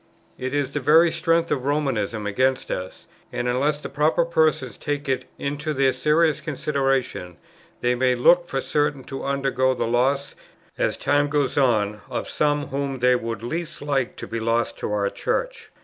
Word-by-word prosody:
It 130 +2 -3
is 140 -1 -1
the 145 - -1
very 160 +5 +5
strength 165 0 +1
of 130 - 0
Romanism 130 -7 -1
against 130 +6 0
us; 95 0 -5 0.3
and, 120 0 -2
unless 140 +5 +1
the 150 - -7
proper 155 +3 +2
persons 155 -8 +1
take 145 0 -3
it 130 -1 -1
into 145 +2 -3
their 135 -1 +3
serious 155 +3 +2
consideration, 135 - -1 0.4
they 120 0 +2
may 125 0 +2
look 175 +8 +4
for 135 -5 -2
certain 145 -2 0
to 135 +2 -7
undergo 135 -1 +1
the - - -1
loss, 130 +4 +1 0.4
as - - 0
time 145 0 +1
goes 145 -2 0
on, 105 -6 +2
of - - -3
some 145 -1 0
whom 140 0 -2
they 125 0 +4
would 115 -1 -4
least 165 +7 -4
like 140 -3 -1
to - - -7
be 115 - -4
lost 115 +1 0
to - - -3
our 100 -1 0
Church." - - -3
135 Hz, 175 wpm, -23 LUFS, 125-150 Hz, 0.4 s, very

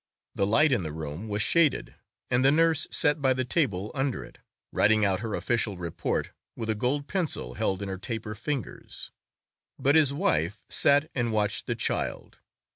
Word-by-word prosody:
The 100 - 0
light 145 +8 +4
in 120 -6 +2
the 80 -3 -4
room 80 +6 -6
was 105 0 0
shaded, 160 +1 +2 0.4
and 125 +1 +3
the 135 - +6
nurse 160 0 +3
sat 145 0 +2
by 130 -1 +3
the 130 0 -1
table 110 - 0
under 135 -2 -1
it, - - -15 0.3
writing 110 0 +4
out 95 -2 +1
her 110 -1 -3
official 115 -5 -1
report 85 -2 -2 0.2
with 110 -1 -2
a - - +2
gold 135 +6 -1
pencil 165 - -2
held 95 +9 -1
in - - -4
her 95 -1 -5
taper 110 0 -4
fingers; 120 - -5 0.7
but 140 - +3
his 155 -3 +5
wife 110 - 0
sat 145 +2 +3
and 120 -3 0
watched 105 -1 0
the - - -1
child. - - -3
115 Hz, 180 wpm, -27 LUFS, 100-145 Hz, 0.7 s, the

